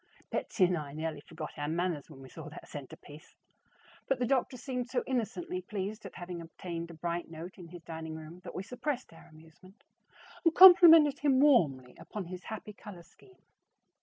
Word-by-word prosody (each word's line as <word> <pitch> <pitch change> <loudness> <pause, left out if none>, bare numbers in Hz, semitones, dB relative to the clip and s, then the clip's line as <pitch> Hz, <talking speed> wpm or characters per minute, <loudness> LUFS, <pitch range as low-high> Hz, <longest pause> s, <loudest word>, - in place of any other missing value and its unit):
Betsy 190 - 0
and 180 0 +1
I 145 -4 -6
nearly 155 0 -4
forgot 155 -1 -9
our 145 - -2
manners 165 -1 -2
when 135 -4 -13
we 130 - -12
saw 160 +1 -9
that 155 - -11
centerpiece; 145 +1 -11 0.7
but 270 - +1
the 245 - 0
doctor 255 0 0
seemed 250 -1 -4
so 255 - -1
innocently 265 - -2
pleased 210 - -5
at - - -14
having 175 -1 -6
obtained 170 0 -7
a 170 - -10
bright 170 +1 -3
note 170 +4 -9
in 175 - -10
his 170 0 -12
dining 160 -1 -7
room 160 +2 -10
that 175 - -9
we 185 - -4
suppressed 250 - -4
our 165 - -16
amusement 160 +6 -18 0.6
and 330 -2 +3
complimented 330 -6 +9
him 275 -3 +3
warmly 150 - +3
upon 210 -3 -7
his 180 +1 -9
happy 215 -1 -7
color 200 -4 -11
scheme. 380 - -22
180 Hz, 185 wpm, -31 LUFS, 160-250 Hz, 0.7 s, complimented